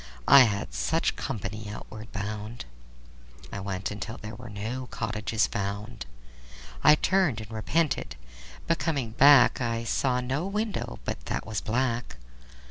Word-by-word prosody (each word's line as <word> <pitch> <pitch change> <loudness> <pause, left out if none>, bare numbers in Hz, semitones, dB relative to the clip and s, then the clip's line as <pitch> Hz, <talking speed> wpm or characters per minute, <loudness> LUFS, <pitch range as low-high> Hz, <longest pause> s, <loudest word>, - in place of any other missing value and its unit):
I 140 -2 +10
had 100 -3 -2
such - - 0
company 105 +1 -4
outward 110 +1 -9
bound. 105 - -5 0.9
I - - -4
went 100 -1 -4
till 105 +3 -4
there 105 +1 -8
were 120 +2 -9
no 115 +5 -4
cottages 110 -1 -1
found. 100 - -4 0.8
I 150 - +8
turned 180 - +2
and 110 0 -9
repented, 120 - 0 0.5
but 165 - +1
coming 140 -9 -1
back 135 +1 +6
I 115 -1 -1
saw 125 +2 +1
no 135 +8 -2
window 210 +1 -2
but - - -4
that - - -2
was 105 -4 -3
black. 120 - -1
115 Hz, 135 wpm, -27 LUFS, 105-130 Hz, 0.9 s, I